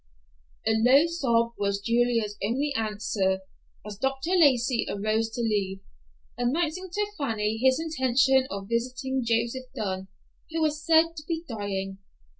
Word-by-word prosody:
A 220 - +3
low 250 +7 +5
sob 235 -9 +1
was 200 0 0
Julia's 230 -1 +1
only 270 +7 0
answer 205 -3 0 0.4
as 210 -1 -7
Dr. 270 +5 -1
Lacey 265 -8 +3
arose 215 +2 0
to 240 - -3
leave, 195 -3 -1 0.6
announcing 320 +8 -1
to 415 +3 0
Fanny 220 -5 -1
his 260 +3 +3
intention 265 -4 +2
of 195 0 -5
visiting 255 +3 -1
Joseph 235 +2 0
Dunn, 190 -2 -3 0.4
who 325 0 -3
was 305 -1 0
said 330 0 +4
to 300 - -6
be 330 0 -3
dying. 195 -4 -4
240 Hz, 135 wpm, -27 LUFS, 210-285 Hz, 0.6 s, low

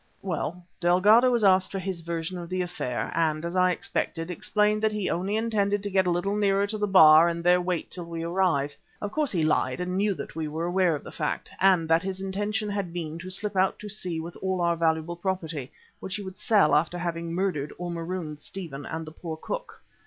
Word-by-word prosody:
Well, 175 -1 -3
Delgado 205 +8 +5
was 240 -3 +1
asked 190 -1 +4
for 195 - -3
his 190 -2 -4
version 170 +2 -4
of 170 -1 -7
the 185 0 -1
affair, 150 -9 -3
and, 160 -1 0
as 170 +2 -4
I 185 0 +4
expected, 170 -1 -2
explained 210 +4 +1
that 220 0 +2
he 210 -2 -1
only 190 +4 -1
intended 205 -3 0
to 205 - -3
get 190 -1 +3
a - - +3
little 175 +4 0
nearer 200 -1 +2
to 215 +1 -3
the 210 - +1
bar 160 -3 +8
and 170 0 -4
there 180 +1 +5
wait 180 -2 -2
till 175 -2 -5
we 165 -1 -5
arrived. 170 -5 +1 0.2
Of 205 - -4
course 300 +3 0
he 170 -5 +1
lied 155 +3 +1
and 180 0 -2
knew 200 0 +1
that - - -8
we 160 -1 -2
were 160 +3 -3
aware 175 -2 +2
of 145 - -7
the - - -9
fact - - -3
and 185 -4 +4
that 165 +1 +4
his 190 0 -4
intention 205 +3 -2
had 200 -4 -3
been 165 -2 -5
to 185 +2 -7
slip 200 +2 -2
out 190 0 +2
to 210 - -8
sea 180 -5 -3
with 170 +2 -7
all 190 -1 -2
our 170 0 +2
valuable 165 +1 0
property, 165 -7 -3 0.3
which 190 - -5
he 205 - -4
would 190 +1 -9
sell 205 -11 +4
after 155 +4 +2
having 170 -1 -3
murdered 170 -5 -1
or 175 0 -4
marooned 165 -2 -4
Stephen 150 -5 -7
and 160 0 -4
the 155 - -9
poor 160 0 -6
cook. - - -6
180 Hz, 225 wpm, -27 LUFS, 165-195 Hz, 0.3 s, bar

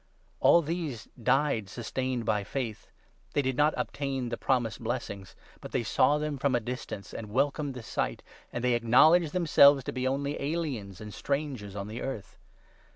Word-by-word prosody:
All 170 - +6
these 155 -7 -4
died 130 -4 +2
sustained 125 +1 -3
by 105 -1 +1
faith. 115 0 -5 0.4
They 145 - +2
did 130 -1 0
not 150 +3 +3
obtain 135 -3 -2
the 115 - -2
promised 120 -2 0
blessings, 110 -5 -4 0.2
but - - -10
they 125 - +1
saw 130 +6 +3
them 150 -2 -3
from 140 -1 +2
a - - +3
distance 115 -3 -6
and 110 -2 -6
welcomed 140 +3 0
the 125 - -7
sight, - - -2 0.3
and 120 - -4
they 125 -1 +3
acknowledged 145 +8 +5
themselves 145 -6 +6
to - - -4
be 130 0 -1
only 140 +2 -1
aliens 140 - -3
and 105 -1 -8
strangers 140 -9 -3
on 100 0 -4
the 110 +2 -6
earth. 135 -7 -6
130 Hz, 170 wpm, -29 LUFS, 115-145 Hz, 0.4 s, All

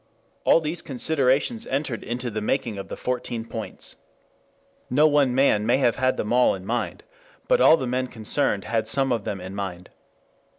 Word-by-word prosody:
All 165 - +5
these 160 +2 -3
considerations 145 - 0
entered 135 -3 -2
into 120 +1 -3
the 110 0 -3
making 110 -2 -1
of 95 - -7
the - - -7
Fourteen 120 -2 -3
Points. 110 -2 -5 0.9
No 145 +5 +4
one 145 -4 +3
man 130 -6 +3
may 120 +4 +3
have 125 -4 +2
had 130 0 +1
them 105 +2 -2
all 125 -4 +4
in 95 -1 -10
mind, 120 +4 -3 0.4
but - - +3
all 165 - +7
the 130 - -3
men 130 +1 -1
concerned 105 -3 -1
had 110 +1 -1
some 135 +3 +1
of 115 -4 -1
them 100 - -3
in 95 +1 -8
mind. 95 -3 -6
125 Hz, 180 wpm, -24 LUFS, 110-135 Hz, 0.9 s, all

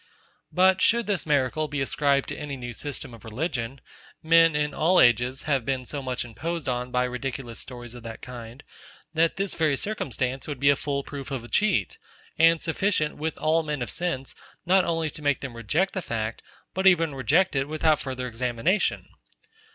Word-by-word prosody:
But 185 +1 +4
should 235 0 +4
this 195 -5 -1
miracle 145 +1 +1
be 150 -1 -3
ascribed 140 0 +1
to - - -4
any 145 -2 -5
new 120 -1 -6
system 140 0 -6
of 115 - -13
religion; 130 +1 -3 0.4
men, 165 0 +5
in 150 -1 0
all 175 +4 +3
ages, 120 +2 +4
have 140 -5 +1
been 130 +1 -2
so 140 +3 -5
much 130 -2 -3
imposed 165 +8 -4
on 125 0 -1
by 125 0 +1
ridiculous 125 -1 -4
stories 120 -2 -7
of 120 - -10
that 115 0 -8
kind, 120 +1 -9 0.5
that 165 +1 +2
this 195 +1 -1
very 155 -4 +1
circumstance 130 - -2
would 145 -4 -5
be 140 +1 +5
a - - +3
full 140 0 -2
proof 140 -2 -7
of 135 -4 -4
a - - -9
cheat, 195 - +1 0.4
and 165 0 +5
sufficient, 165 -2 0
with 155 +1 -3
all 160 +1 +2
men 150 -4 -3
of - - -5
sense, 170 -7 -2 0.3
not 185 +1 +4
only 165 -2 0
to - - -7
make 145 -2 +1
them 130 -4 -6
reject 150 - 0
the 190 - -2
fact, 110 -6 -3 0.3
but 190 +1 +2
even 165 -5 +4
reject 145 +7 +2
it 135 0 +1
without 155 0 +2
farther 130 -3 -4
examination. 125 - 0
140 Hz, 190 wpm, -26 LUFS, 125-165 Hz, 0.5 s, men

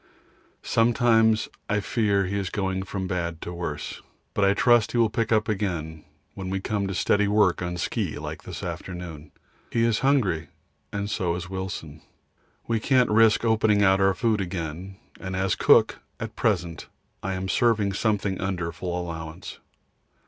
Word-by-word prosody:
Sometimes 115 -1 +3 0.2
I 105 -1 +2
fear 100 -1 +1
he 95 +2 -3
is 95 -2 -3
going 95 -1 -2
from 95 0 -4
bad 85 -3 -3
to 90 - -6
worse, 75 -4 -5 0.3
but 105 - +1
I 100 0 +4
trust 120 0 +4
he - - 0
will 115 -2 +3
pick 115 0 -1
up 110 -1 +3
again 85 -7 -3 0.3
when 95 -1 -6
we 95 0 -1
come 100 0 -2
to 95 - -3
steady 105 +2 +2
work 100 -4 +3
on 90 0 -3
ski - - -2
like - - -6
this - - -8
afternoon. 85 -5 -6 0.4
He 115 - +1
is 115 -2 +2
hungry 110 - +1 0.4
and 100 0 -3
so 90 -5 -1
is 90 +1 -6
Wilson. 95 -5 -5 0.6
We 115 -1 0
can't 125 0 +3
risk 110 +1 +4
opening 110 -2 +3
out 95 0 +4
our 95 0 +3
food 110 0 +1
again, 90 0 -5 0.2
and 95 -1 -5
as 95 0 +1
cook - - +4 0.2
at 110 -1 -6
present 90 -7 -1 0.3
I 95 - -2
am 95 0 -3
serving 105 -2 +2
something 100 -2 0
under 90 -3 -2
full 90 +1 -4
allowance. 80 0 -7
95 Hz, 165 wpm, -25 LUFS, 90-110 Hz, 0.6 s, I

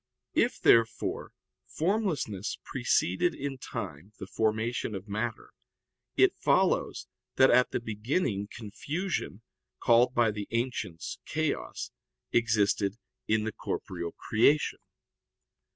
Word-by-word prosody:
If, - - +2
therefore, 115 -1 +3 0.4
formlessness 160 - -1
preceded 95 - +1
in 135 -1 -4
time 90 - -6
the - - -6
formation 110 0 -1
of 95 +2 -7
matter, 110 +3 -3 0.7
it - - +5
follows - - +2 0.3
that 130 - +6
at 125 +1 +5
the - - -1
beginning 110 - -1
confusion, 120 - -4 0.4
called 120 +2 +4
by 115 -2 +4
the 105 -1 -5
ancients 115 -8 -3
chaos, - - -2 0.4
existed 105 -3 +2 0.3
in 110 0 +2
the 110 - -2
corporeal 85 -2 -4
creation. 140 +7 +2
110 Hz, 105 wpm, -29 LUFS, 105-125 Hz, 0.7 s, that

